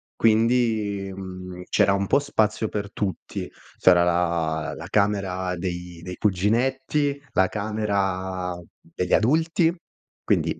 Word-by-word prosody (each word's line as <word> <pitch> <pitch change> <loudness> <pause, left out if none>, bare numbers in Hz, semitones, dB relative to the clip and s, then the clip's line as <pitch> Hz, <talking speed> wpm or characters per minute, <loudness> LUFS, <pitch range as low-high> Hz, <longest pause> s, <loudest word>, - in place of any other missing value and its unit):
Quindi, 110 -3 +2
mhmm, 90 -1 -8
c'era 100 -1 +3
un 100 0 0
po' 140 - +3
spazio 110 -6 0
per 100 -1 -4
tutti. 95 -5 -4 0.3
C'era 90 -1 +6
la 85 -3 0
la - - -8
camera 95 -3 0
dei 90 -1 -5
dei 90 0 -6
cuginetti, 130 +8 +1
la 95 - +3
camera 95 -4 -2 0.3
degli 90 +2 -4
adulti, 160 - +3 0.5
quindi, - - +1
100 Hz, 115 wpm, -24 LUFS, 90-110 Hz, 0.5 s, C'era